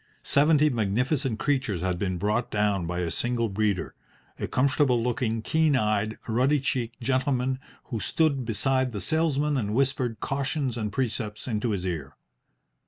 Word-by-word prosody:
Seventy 150 +1 +4
magnificent 125 +3 0
creatures 125 - 0
had 90 -1 -1
been 95 -2 -1
brought 105 +6 0
down 105 -4 +1
by 90 +1 -2
a 85 -2 -2
single 120 +1 -1
breeder, 100 -2 -1 0.5
a - - -2
comfortable 130 -2 +2
looking, 115 -2 -1
keen 160 0 +2
eyed, 110 -2 +1
ruddy 130 +6 +2
cheeked 125 -3 -2
gentleman 130 +1 0 0.2
who 115 -5 -4
stood 145 +1 +1
beside 125 +3 0
the 105 - -3
sales 155 - +1
man 145 0 +1
and 105 -3 -1
whispered 130 -4 0
cautions 135 -1 -1
and 105 -3 -3
precepts 110 -3 -3
into 115 0 -1
his 95 -4 -2
ear. 75 -6 -4
120 Hz, 155 wpm, -27 LUFS, 105-135 Hz, 0.5 s, Seventy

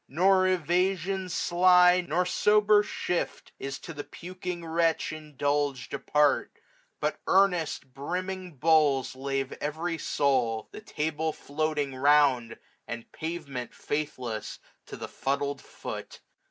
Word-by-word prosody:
Nor 185 +5 +4
evasion 185 +2 0
sly. 180 +1 +5
Nor 180 +4 +2
sober 210 +2 +4
shift, 180 -4 -3
is 135 0 -4
to 165 - -9
the 145 -1 -6
puking 180 0 -7
wretch 165 -1 +1
Indulged 145 -3 -2
apart 150 -1 +2
j - - -31 0.4
but 150 0 -1
earnest, 175 -8 +2
brimming 180 +4 -4
bowls 150 -2 +3
535 130 +1 -12 0.3
Lave - - -8
every 160 +3 -2
soul, 125 -8 0
the - - -9
table 160 -4 -2
floating 150 -2 -2
round. 135 -4 +3 0.3
And 115 0 -7
pavement, 155 -7 -5
faithless 130 -7 -4 0.3
to - - -8
the - - -6
fuddled 140 0 -2
foot. - - -8
155 Hz, 120 wpm, -28 LUFS, 140-180 Hz, 0.4 s, sly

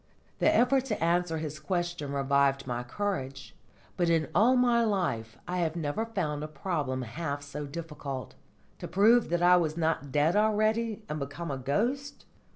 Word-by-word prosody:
The - - +4
effort 260 +2 +3
to 215 -9 -2
answer 170 -1 +1
his 155 -1 -5
question 175 -2 -2
revived 140 0 +2
my 120 -1 -3
courage. 135 -2 -4 0.4
But 175 -2 +2
in 165 -2 +2
all 225 - +5
my 240 -2 +4
life 145 - -1
I 180 0 -2
have 165 -2 0
never 165 +7 -2
found 155 -10 -2
a - - -3
problem 145 -4 -2
half 145 +4 -4
so 145 +1 -6
difficult. 145 -5 -6 0.5
To - - -6
prove 225 +5 +4
that 175 +1 0
I 180 0 +7
was 160 -2 0
not 160 -4 -1
dead 150 +6 +2
already 215 +1 +1
and 150 - -4
become 145 +3 -5
a 135 - -3
ghost! 240 - -2
165 Hz, 165 wpm, -29 LUFS, 140-205 Hz, 0.5 s, I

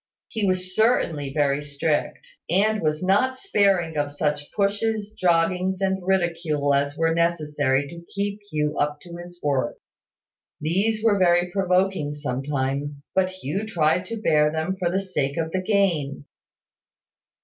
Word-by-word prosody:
He 220 -4 -1
was 185 0 -1
certainly 165 - +2
very 140 0 +1
strict, 150 +1 -2 0.2
and 210 +5 +2
was 155 +1 0
not 230 +8 +2
sparing 195 - +1
of 145 0 -1
such 150 -1 -1
pushes, 210 +1 0
joggings, 180 +1 +1
and 190 -1 0
ridicule 170 -6 0
as 140 +1 0
were 165 0 +2
necessary 150 -5 +1
to 170 +2 -10
keep 200 +1 -2
Hugh 150 -1 -1
up 150 0 0
to 170 -1 -10
his 175 0 -11
work. 140 -3 0 0.8
These 200 +8 0
were 210 -3 +3
very 175 -1 +3
provoking 185 -5 +1
sometimes; 140 +1 -3
but 185 -1 +2
Hugh 185 +1 -4
tried 175 -3 +1
to 230 +3 -5
bear 150 -7 +3
them 160 +4 -2
for 180 -2 0
the 185 +2 0
sake 150 -7 -2
of 160 -1 -1
the 185 - -1
gain. 180 -9 0
170 Hz, 145 wpm, -24 LUFS, 150-190 Hz, 0.8 s, were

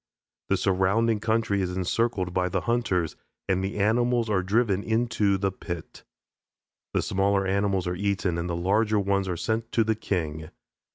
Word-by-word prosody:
The - - +3
surrounding 100 +4 +2
country 110 -2 +1
is 90 0 -2
encircled 95 -1 0
by 90 0 +1
the - - -1
hunters 115 -8 0 0.3
and 95 0 +1
the 95 +2 -3
animals 115 +2 +2
are 95 -2 +2
driven 100 +1 +1
into 110 -3 +1
the 95 0 0
pit. 85 -3 -7 0.9
The - - +2
smaller 100 0 +1
animals 95 -1 +1
are 90 - -1
eaten 95 -2 -1
and 85 +1 -3
the 85 - -1
larger 105 +5 +2
ones 100 -1 0
are 90 -2 -2
sent 115 +5 -2
to 115 - +4
the 110 +1 +1
king. 80 -7 -3
100 Hz, 165 wpm, -26 LUFS, 90-110 Hz, 0.9 s, to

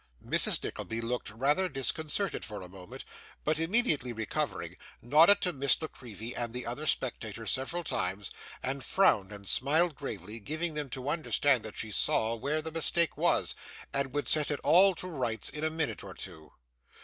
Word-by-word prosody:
Mrs. - - +2
Nickleby 115 0 -4
looked 115 +1 -3
rather 145 - +1
disconcerted 155 - 0
for 105 -3 -7
a - - -8
moment, 90 -1 -10 0.4
but 155 +1 +1
immediately 165 - +2
recovering, 110 -2 -3 0.2
nodded 155 - +6
to 180 - +1
Miss 140 -1 +3
La 155 - -3
Creevy 115 -1 -8
and 120 -1 -3
the 125 - -4
other 135 +6 -4
spectators 115 -4 -1
several 150 +7 -1
times, 95 - -2 0.3
and 135 +1 -2
frowned, 105 - +3
and 100 -1 -9
smiled 155 - +3
gravely, 110 - -7
giving 155 +8 -2
them 150 -2 -3
to 130 +2 -6
understand 145 -4 +2
that 110 -1 -8
she 110 - -4
saw 110 +2 +2
where 140 +7 -1
the 160 - -4
mistake 165 +1 +2
was, - - +2 0.4
and 140 -1 0
would 145 +2 -2
set 155 -2 +4
it 145 - -1
all 190 +2 +6
to - - -7
rights 125 -9 -2
in 150 - -5
a 160 - +2
minute 160 -1 -2
or - - -9
two. 80 -1 -9
135 Hz, 175 wpm, -30 LUFS, 115-160 Hz, 0.4 s, nodded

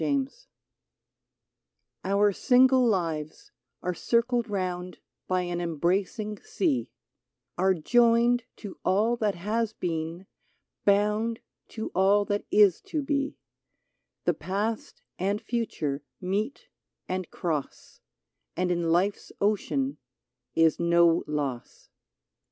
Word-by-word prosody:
UNITED 275 -1 0 1.7
/^UR 200 +1 +3
single 260 0 +5
lives 165 -7 -2 0.3
are 180 - -1
circled 235 +4 +1
round 180 -2 -3 0.3
By 185 0 +1
an 175 0 -3
embracing 190 - -1
sea; 370 - -1 0.7
Are 190 +1 +3
joined 235 +6 +3
to 205 -3 -9
all 215 +5 +2
that 210 -3 0
has 215 +5 -1
been, 165 0 -4 0.6
bound 210 +3 +2 0.4
To 220 - -3
all 200 +2 +4
that 205 +1 -2
is 205 -4 +5
to 305 -3 -2
be: 280 0 -1 0.9
The - - +2
past 210 +4 -3 0.2
and 200 +3 0
future 160 - -2 0.2
meet 210 - -2 0.4
and 185 -1 -3
cross, 155 -5 -4 0.6
And 180 0 +1
in 170 -1 0
life's 185 +5 +1
ocean 150 -9 0 0.6
is 165 -1 +4
no 170 0 +4
loss. 140 -5 -4
200 Hz, 105 wpm, -27 LUFS, 175-230 Hz, 1.7 s, single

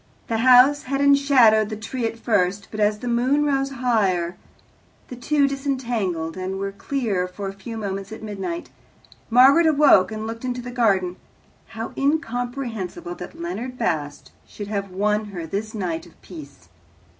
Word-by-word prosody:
The 225 -1 0
house 255 +4 +6
had 275 +1 -3
enshadowed 275 -7 +5
the 215 - -4
tree 230 +2 -3
at 230 - -6
first, 200 -3 0
but 215 - -6
as 210 0 +2
the 245 - -7
moon 255 +5 +2
rose 275 -1 +1
higher 205 -10 0 0.7
the 250 - -7
two 280 +3 +1
disentangled, 240 - -2
and 185 +1 -4
were 195 0 -3
clear 200 -4 -2
for 195 +2 -6
a 195 - -5
few 225 +4 -8
moments 195 -1 -5
at 220 - -8
midnight. 215 - -5 0.6
Margaret 270 +8 +6
awoke 285 -11 +5
and 215 0 -5
looked 230 +1 -6
into 250 -1 -3
the 245 - -6
garden. 195 -7 +1 0.5
How 225 +1 -7
incomprehensible 250 - -2
that 335 -1 -10
Leonard 260 -8 -5
Bast 145 -7 -3 0.2
should 205 -1 -8
have 200 -2 -3
won 210 +3 0
her 185 -5 -6
this 210 +6 -4
night 175 -4 -3
of 170 - -21
peace! 140 - -12
225 Hz, 160 wpm, -23 LUFS, 195-260 Hz, 0.7 s, house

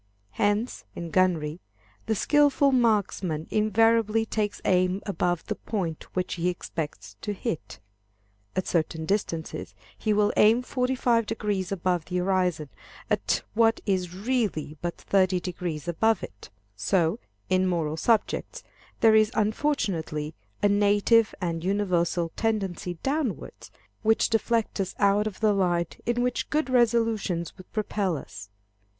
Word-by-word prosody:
Hence, 205 - 0
in 170 -1 -6
gunnery, 170 -4 +1 0.5
the 220 - +1
skilful 285 +3 +3
marksman 205 - +1
invariably 225 +1 +3
takes 210 -2 -2
aim 185 +1 +2
above 175 -3 -1
the - - -2
point 180 -8 -4
which 185 0 -1
he 175 0 0
expects 145 - -5
to 210 - -3
hit. 175 -4 -4 0.8
At 185 - 0
certain 160 -1 -1
distances, 160 - -3 0.2
he 215 - -1
will 210 0 +3
aim 225 +4 +5
45° 230 -7 0
above 180 -3 0
the 180 - -3
horizon 180 -5 0 0.4
at - - +1
what 225 +1 +3
is 180 -3 -1
really 205 - -1
but 175 0 -3
30° 180 -4 -1
above 220 +7 +1
it. 105 - -9 0.3
So, 160 - +1 0.3
in 185 0 +2
moral 165 -4 0
subjects, 225 +7 0 0.4
there 225 -1 +6
is 215 0 +5
unfortunately 200 - -1 0.3
a - - +6
native 205 +2 +3
and 165 -3 -2
universal 180 -3 0
tendency 195 -5 -1
downwards, 275 -5 -3 0.3
which 220 0 +3
deflects 225 -1 0
us 190 -2 -2
out 205 +1 +3
of 210 -1 -7
the 215 -1 +4
line 175 -3 +1 0.2
in 240 +1 +1
which 250 -1 -1
good 305 -3 0
resolutions 225 -8 +1
would 185 - -15
propel 205 -5 -1
us. 105 -6 -10
195 Hz, 130 wpm, -26 LUFS, 175-220 Hz, 0.8 s, there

